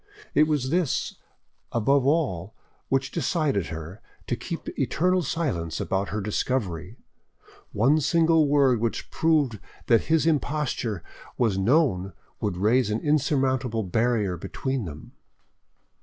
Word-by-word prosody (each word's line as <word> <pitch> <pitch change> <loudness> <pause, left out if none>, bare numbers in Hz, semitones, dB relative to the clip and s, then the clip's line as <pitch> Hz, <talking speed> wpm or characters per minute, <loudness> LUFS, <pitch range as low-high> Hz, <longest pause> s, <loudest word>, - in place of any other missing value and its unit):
It 150 - +4
was 145 -4 0
this 170 -5 0 0.5
above 135 +4 +2
all 120 - 0 0.3
which 135 -1 0
decided 155 - 0
her 80 +6 -8 0.2
to - - -1
keep - - -6
eternal 185 +3 +1
silence 125 - -2
about 95 0 -1
her 105 +1 -2
discovery; 100 -2 -2 0.7
one 135 +9 +3
single 160 +1 +3
word 140 -4 +3
which 115 0 -3
proved 150 -9 +1 0.3
that 115 - +3
his 160 -1 +2
imposture 145 - -1 0.3
was 110 -6 +1
known 100 - +2 0.3
would 90 - -2
raise 110 +5 +2
an 105 +2 -1
insurmountable 130 -6 +1
barrier 105 -1 0
between 130 +7 -3
them. 75 -2 -9
125 Hz, 120 wpm, -25 LUFS, 100-150 Hz, 0.7 s, It